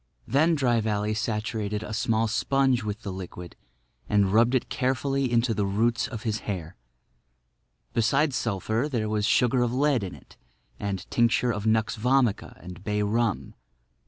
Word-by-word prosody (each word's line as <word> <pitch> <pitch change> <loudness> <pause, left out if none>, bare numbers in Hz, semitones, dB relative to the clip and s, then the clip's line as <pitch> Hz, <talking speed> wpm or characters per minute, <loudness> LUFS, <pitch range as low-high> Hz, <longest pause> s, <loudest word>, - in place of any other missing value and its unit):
Then 155 +6 +3
Dry 120 -5 +2
Valley 105 0 -1
saturated 105 -1 -2
a 105 - -6
small 110 0 +1
sponge 130 +2 +1
with 105 +2 -5
the 100 - -4
liquid 90 -2 -8 0.5
and 100 -2 +2
rubbed 120 +4 +4
it 125 - 0
carefully 135 0 0
into 120 0 +2
the 105 -2 0
roots 115 +3 +1
of 115 -4 -7
his 110 -2 -1
hair. 85 -5 -4 1.2
Besides 135 +5 +2
sulphur 115 +2 -1
there 110 -4 -1
was 105 -1 0
sugar 125 +2 +3
of 120 -1 +1
lead 140 -4 +2
in 95 - -5
it - - -18 0.4
and 100 -2 -3
tincture 120 +1 +2
of 105 0 -3
nux 110 0 +1
vomica 125 -2 +1
and 90 0 -10
bay 105 0 0
rum. 110 0 -1
110 Hz, 160 wpm, -26 LUFS, 105-125 Hz, 1.2 s, rubbed